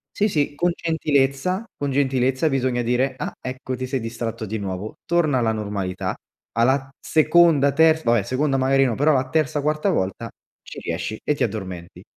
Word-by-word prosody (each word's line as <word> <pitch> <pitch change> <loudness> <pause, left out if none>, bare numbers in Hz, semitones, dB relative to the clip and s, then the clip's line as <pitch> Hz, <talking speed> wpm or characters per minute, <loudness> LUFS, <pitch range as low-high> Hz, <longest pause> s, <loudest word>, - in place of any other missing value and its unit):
Sì, 210 - +2
sì 145 -5 0
con 175 +3 +1
gentilezza, 160 - 0
con 145 - -3
gentilezza 130 +1 +1
bisogna 130 -4 0
dire: 130 +3 0
“Ah - - -4
ecco 130 0 -5
ti 130 0 -4
sei 130 0 -1
distratto 115 0 -4
di 110 +1 -4
nuovo, 95 +2 -5
torna 160 -6 +2
alla 115 -2 +1
normalità”. 100 -3 -3 0.4
Alla 130 +4 +2
seconda, 155 -2 +4
terz 160 +1 +4
vabbè 115 -2 +3
seconda 135 +5 0
magari 135 +1 +3
no, 120 - 0
però 145 +6 +3
la 130 -1 +1
terza, 155 0 0
quarta 155 +5 +1
volta, 95 - -2 0.3
ci - - -11
riesci 85 +6 -4
e 150 - +1
ti - - -8
addormenti. 95 -5 -5
130 Hz, 175 wpm, -22 LUFS, 115-150 Hz, 0.4 s, seconda